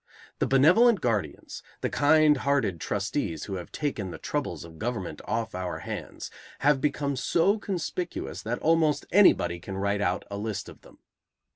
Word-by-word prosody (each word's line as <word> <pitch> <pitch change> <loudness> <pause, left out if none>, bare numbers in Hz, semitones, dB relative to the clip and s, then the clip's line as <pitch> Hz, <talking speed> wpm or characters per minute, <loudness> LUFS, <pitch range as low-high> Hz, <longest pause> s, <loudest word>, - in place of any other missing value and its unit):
The - - +1
benevolent 185 - +5
guardians, 105 - -2 0.2
the - - 0
kind 150 0 +4
hearted 125 - 0
trustees 100 - -2
who 95 -2 -4
have 90 - -8
taken 125 -10 -3
the - - -7
troubles - - -3
of 80 -1 -13
government 110 -5 -4
off 115 0 -2
our 90 -1 -3
hands, - - -6 0.3
have 145 -1 +3
become 140 -1 0
so 170 - +2
conspicuous 180 -2 -4
that 115 +3 -2
almost 160 -2 +2
anybody 90 - +4
can 95 +2 -7
write 100 +1 0
out 90 -2 0
a 100 - -3
list 105 -1 -4
of - - -14
them. - - -18
125 Hz, 160 wpm, -27 LUFS, 100-150 Hz, 0.3 s, benevolent